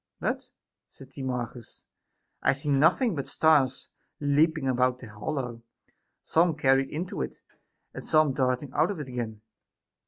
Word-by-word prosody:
But, -, -, -2 dB, 0.4 s
said 135 Hz, -1 st, -15 dB
Timarchus, 125 Hz, -3 st, -5 dB, 0.6 s
I -, -, +3 dB
see 140 Hz, +2 st, -4 dB
nothing 165 Hz, -, +4 dB
but 140 Hz, -4 st, -4 dB
stars 135 Hz, -3 st, +2 dB, 0.3 s
leaping 150 Hz, 0 st, +2 dB
about 125 Hz, 0 st, +2 dB
the 125 Hz, -, -11 dB
hol 105 Hz, +6 st, -5 dB
low, 120 Hz, -4 st, -4 dB, 0.6 s
some 165 Hz, -1 st, +2 dB
carried 135 Hz, -2 st, +3 dB
into 170 Hz, -, -4 dB
it, 65 Hz, -, -4 dB, 0.6 s
and -, -, -7 dB
some 155 Hz, -3 st, +3 dB
darting 130 Hz, 0 st, 0 dB
out -, -, +2 dB
of 200 Hz, -5 st, -4 dB
it 145 Hz, -, -5 dB
again. 115 Hz, -4 st, -5 dB
135 Hz, 145 wpm, -27 LUFS, 125-155 Hz, 0.6 s, nothing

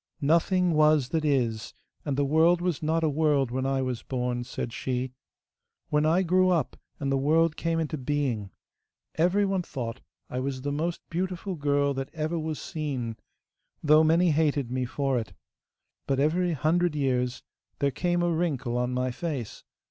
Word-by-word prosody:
'Nothing 170 Hz, +4 st, +2 dB
was 150 Hz, -4 st, +4 dB
that 160 Hz, -2 st, 0 dB
is, 120 Hz, -7 st, 0 dB, 0.3 s
and 140 Hz, -2 st, -2 dB
the 145 Hz, -, +2 dB
world 160 Hz, +4 st, +4 dB
was 175 Hz, -4 st, -1 dB
not 160 Hz, +1 st, +1 dB
a -, -, +3 dB
world 145 Hz, -4 st, +2 dB
when 130 Hz, +1 st, -1 dB
I 135 Hz, -1 st, 0 dB
was 125 Hz, -2 st, -3 dB
born,' 125 Hz, -1 st, -2 dB
said 120 Hz, -1 st, -5 dB
she. 130 Hz, 0 st, -3 dB, 0.8 s
'When 150 Hz, +1 st, +2 dB
I 175 Hz, +4 st, +3 dB
grew 185 Hz, +1 st, +3 dB
up 170 Hz, -7 st, +1 dB, 0.2 s
and 140 Hz, -1 st, -1 dB
the 135 Hz, -, +2 dB
world 155 Hz, +3 st, +3 dB
came 165 Hz, 0 st, -1 dB
into 155 Hz, -2 st, -2 dB
being, 130 Hz, -7 st, -1 dB, 0.6 s
everyone 190 Hz, +3 st, +2 dB
thought 120 Hz, -9 st, -5 dB, 0.3 s
I 125 Hz, -, -4 dB
was 130 Hz, 0 st, -3 dB
the 145 Hz, -, -1 dB
most 165 Hz, +4 st, -2 dB
beautiful 185 Hz, +2 st, -2 dB
girl 145 Hz, -2 st, +1 dB
that 135 Hz, 0 st, -4 dB
ever 160 Hz, +2 st, -1 dB
was 155 Hz, -1 st, -3 dB
seen, 135 Hz, -9 st, -4 dB, 0.7 s
though 155 Hz, +1 st, +6 dB
many 165 Hz, +2 st, +4 dB
hated 145 Hz, -5 st, +1 dB
me 130 Hz, 0 st, -1 dB
for 135 Hz, 0 st, 0 dB
it. 110 Hz, -, -7 dB, 0.7 s
But 135 Hz, -1 st, +1 dB
every 170 Hz, +4 st, +2 dB
hundred 165 Hz, +3 st, +1 dB
years 125 Hz, -3 st, 0 dB, 0.3 s
there 140 Hz, 0 st, +1 dB
came 175 Hz, +3 st, 0 dB
a 175 Hz, -, +2 dB
wrinkle 135 Hz, -8 st, -1 dB
on 125 Hz, +1 st, -1 dB
my 125 Hz, 0 st, 0 dB
face. 135 Hz, -5 st, -5 dB
150 Hz, 170 wpm, -27 LUFS, 130-165 Hz, 0.8 s, though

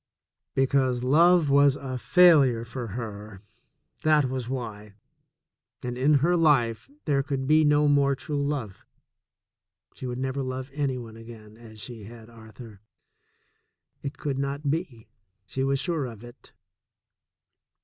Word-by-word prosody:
Because 130 Hz, -2 st, +1 dB
love 165 Hz, +3 st, +4 dB
was 140 Hz, -1 st, +5 dB
a 130 Hz, -2 st, -6 dB
failure 140 Hz, -9 st, +5 dB
for 120 Hz, +1 st, -6 dB
her 105 Hz, -3 st, -8 dB, 0.3 s
— -, -, -43 dB
that 155 Hz, -2 st, +3 dB
was 130 Hz, -2 st, -4 dB
why 105 Hz, -5 st, -6 dB, 0.9 s
—and 125 Hz, 0 st, -4 dB
in 140 Hz, +4 st, +3 dB
her 175 Hz, +1 st, +3 dB
life 135 Hz, -, +2 dB, 0.2 s
there 140 Hz, -3 st, +2 dB
could 135 Hz, -1 st, -3 dB
be 155 Hz, +3 st, +4 dB
no 150 Hz, 0 st, +3 dB
more 140 Hz, -1 st, +3 dB
true 145 Hz, +1 st, -3 dB
love. 135 Hz, -9 st, -4 dB, 1.1 s
She 130 Hz, -, -7 dB
would 125 Hz, 0 st, -4 dB
never 130 Hz, +1 st, -2 dB
love 130 Hz, +1 st, -5 dB
any 140 Hz, -3 st, -1 dB
one 115 Hz, -2 st, -9 dB
again 110 Hz, -2 st, -13 dB
as 110 Hz, -1 st, -14 dB
she 110 Hz, 0 st, -9 dB
had 115 Hz, +1 st, -13 dB
Arthur. 110 Hz, -2 st, -13 dB, 1.2 s
It 140 Hz, -, -6 dB
could 140 Hz, -2 st, -3 dB
not 140 Hz, +1 st, -2 dB
be, 150 Hz, -9 st, -4 dB, 0.4 s
she 135 Hz, +6 st, -3 dB
was 135 Hz, 0 st, +1 dB
sure 160 Hz, -5 st, -2 dB
of 115 Hz, -2 st, -11 dB
it. 120 Hz, +1 st, -14 dB
130 Hz, 140 wpm, -26 LUFS, 115-145 Hz, 1.2 s, was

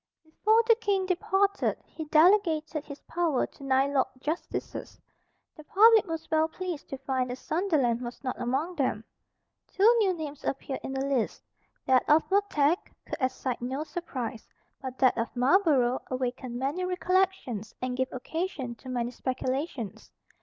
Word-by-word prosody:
Before 430 Hz, +8 st, +2 dB
the 460 Hz, -, +7 dB
King 400 Hz, -4 st, 0 dB
departed 385 Hz, +2 st, +1 dB
he 315 Hz, -, -7 dB
delegated 315 Hz, -2 st, +3 dB
his 285 Hz, -1 st, -9 dB
power 330 Hz, -6 st, 0 dB
to -, -, -15 dB
nine 270 Hz, +1 st, +2 dB
Lords 265 Hz, -2 st, +2 dB
Justices. 310 Hz, +6 st, -4 dB, 0.6 s
The 310 Hz, -, -12 dB
public 435 Hz, +5 st, +6 dB
was 325 Hz, -1 st, -4 dB
well 315 Hz, 0 st, +3 dB
pleased 350 Hz, -1 st, -6 dB
to 270 Hz, -, -4 dB
find 260 Hz, -1 st, -1 dB
that 250 Hz, -, -3 dB
Sunderland 280 Hz, -6 st, 0 dB
was 245 Hz, +2 st, -7 dB
not 255 Hz, -, -3 dB
among 295 Hz, +8 st, -1 dB
them. 255 Hz, -6 st, 0 dB, 0.6 s
Two 400 Hz, +3 st, +3 dB
new 400 Hz, -4 st, +3 dB
names 300 Hz, -4 st, -6 dB
appeared 270 Hz, 0 st, -3 dB
in 265 Hz, -, -5 dB
the 270 Hz, 0 st, -1 dB
list. 270 Hz, -5 st, -1 dB, 0.4 s
That 260 Hz, -1 st, +4 dB
of 305 Hz, +2 st, +6 dB
Montague 355 Hz, -6 st, +3 dB, 0.3 s
could -, -, -5 dB
excite 255 Hz, -1 st, -1 dB
no 260 Hz, +4 st, -2 dB
surprise. 260 Hz, -10 st, -5 dB, 0.3 s
But 260 Hz, -1 st, -6 dB
that 255 Hz, -3 st, +3 dB
of 230 Hz, -, -3 dB
Marlborough 260 Hz, -2 st, +3 dB
awakened 255 Hz, -1 st, -3 dB
many 280 Hz, +8 st, -1 dB
recollections 365 Hz, -, 0 dB
and 255 Hz, 0 st, -2 dB
gave 260 Hz, 0 st, -1 dB
occasion 275 Hz, -1 st, -4 dB
to 260 Hz, -, -11 dB
many 240 Hz, -1 st, -1 dB
speculations. 255 Hz, -, -3 dB
285 Hz, 155 wpm, -28 LUFS, 255-350 Hz, 0.6 s, the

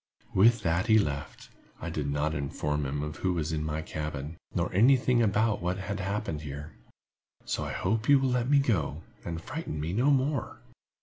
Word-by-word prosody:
With 115 Hz, +4 st, +5 dB
that 85 Hz, +5 st, +1 dB
he 110 Hz, -1 st, +6 dB
left. 75 Hz, -7 st, -2 dB, 0.3 s
I 85 Hz, -, -4 dB
did 75 Hz, -3 st, -2 dB
not 75 Hz, +2 st, 0 dB
inform 75 Hz, 0 st, -2 dB
him 70 Hz, +2 st, -2 dB
of 75 Hz, 0 st, -5 dB
who 95 Hz, -1 st, 0 dB
was 80 Hz, -2 st, -1 dB
in 75 Hz, -1 st, -1 dB
my 80 Hz, 0 st, -2 dB
cabin, 75 Hz, -1 st, -5 dB, 0.2 s
nor -, -, 0 dB
any 120 Hz, +8 st, +6 dB
thing 125 Hz, -1 st, +2 dB
about 110 Hz, -1 st, +2 dB
what 90 Hz, +1 st, -1 dB
had 100 Hz, +1 st, -4 dB
happened 100 Hz, -5 st, -2 dB
here. 75 Hz, 0 st, -7 dB, 0.7 s
So -, -, -2 dB
I -, -, -4 dB
hope 110 Hz, +6 st, -1 dB
you 140 Hz, -, +8 dB
will 135 Hz, -1 st, +1 dB
let 125 Hz, 0 st, 0 dB
me 145 Hz, -, +6 dB
go, 110 Hz, -, 0 dB, 0.2 s
and 85 Hz, -1 st, -4 dB
frighten 140 Hz, -, -5 dB
me 80 Hz, +4 st, -2 dB
no 125 Hz, +8 st, +3 dB
more." 140 Hz, -1 st, +1 dB
90 Hz, 195 wpm, -29 LUFS, 75-115 Hz, 0.7 s, you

